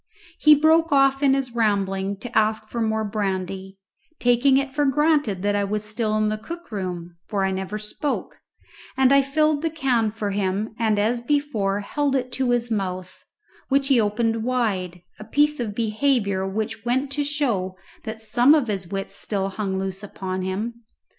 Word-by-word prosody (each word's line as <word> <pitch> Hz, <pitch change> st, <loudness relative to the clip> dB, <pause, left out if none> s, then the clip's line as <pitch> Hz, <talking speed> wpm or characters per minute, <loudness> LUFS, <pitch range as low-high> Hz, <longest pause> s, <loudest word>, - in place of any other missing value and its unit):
He 305 Hz, -1 st, +7 dB
broke 320 Hz, +2 st, +3 dB
off 275 Hz, -1 st, +4 dB
in 275 Hz, -2 st, +4 dB
his 265 Hz, -3 st, -2 dB
rambling 200 Hz, -3 st, 0 dB
to 245 Hz, 0 st, -8 dB
ask 215 Hz, 0 st, +2 dB
for 235 Hz, -, -3 dB
more 220 Hz, 0 st, 0 dB
brandy, 195 Hz, -2 st, -3 dB, 0.4 s
taking 245 Hz, +3 st, +4 dB
it 275 Hz, -1 st, -1 dB
for 295 Hz, +1 st, +1 dB
granted 285 Hz, -, +2 dB
that 205 Hz, 0 st, +1 dB
I 205 Hz, -, +1 dB
was 210 Hz, +1 st, -2 dB
still 215 Hz, 0 st, -1 dB
in 215 Hz, 0 st, +2 dB
the 215 Hz, 0 st, -2 dB
cook 340 Hz, +5 st, -9 dB
room, 175 Hz, -4 st, -5 dB
for 200 Hz, -3 st, 0 dB
I 190 Hz, -, 0 dB
never 190 Hz, +2 st, -3 dB
spoke, 215 Hz, +7 st, -4 dB, 0.6 s
and 265 Hz, 0 st, +5 dB
I 275 Hz, -, +6 dB
filled 305 Hz, +2 st, +1 dB
a 325 Hz, -, +1 dB
can 260 Hz, -8 st, +1 dB
for 210 Hz, -1 st, -3 dB
him 200 Hz, +2 st, -1 dB
and 220 Hz, -2 st, +2 dB
as 230 Hz, +4 st, +1 dB
before 235 Hz, -8 st, 0 dB
held 280 Hz, +6 st, -1 dB
it 255 Hz, -1 st, -1 dB
to 260 Hz, 0 st, 0 dB
his 240 Hz, -1 st, +1 dB
mouth, 185 Hz, -3 st, -3 dB, 0.5 s
which 275 Hz, 0 st, +2 dB
he 255 Hz, -4 st, +5 dB
opened 225 Hz, +1 st, 0 dB
wide, 195 Hz, -8 st, -1 dB, 0.2 s
a -, -, -7 dB
piece 295 Hz, +6 st, +2 dB
of 215 Hz, -4 st, -3 dB
behaviour 215 Hz, -4 st, +1 dB
which 220 Hz, +2 st, -3 dB
went 260 Hz, +4 st, 0 dB
to 290 Hz, +1 st, 0 dB
show 245 Hz, -11 st, -1 dB, 0.3 s
that 220 Hz, -1 st, -6 dB
some 245 Hz, +6 st, +4 dB
of 275 Hz, -7 st, +1 dB
his 190 Hz, -3 st, -2 dB
wits 195 Hz, +1 st, -4 dB
still 195 Hz, -2 st, -1 dB
hung 195 Hz, -1 st, -3 dB
loose 190 Hz, 0 st, -4 dB
upon 190 Hz, -2 st, -5 dB
him. 215 Hz, +6 st, -4 dB
220 Hz, 180 wpm, -23 LUFS, 200-270 Hz, 0.6 s, He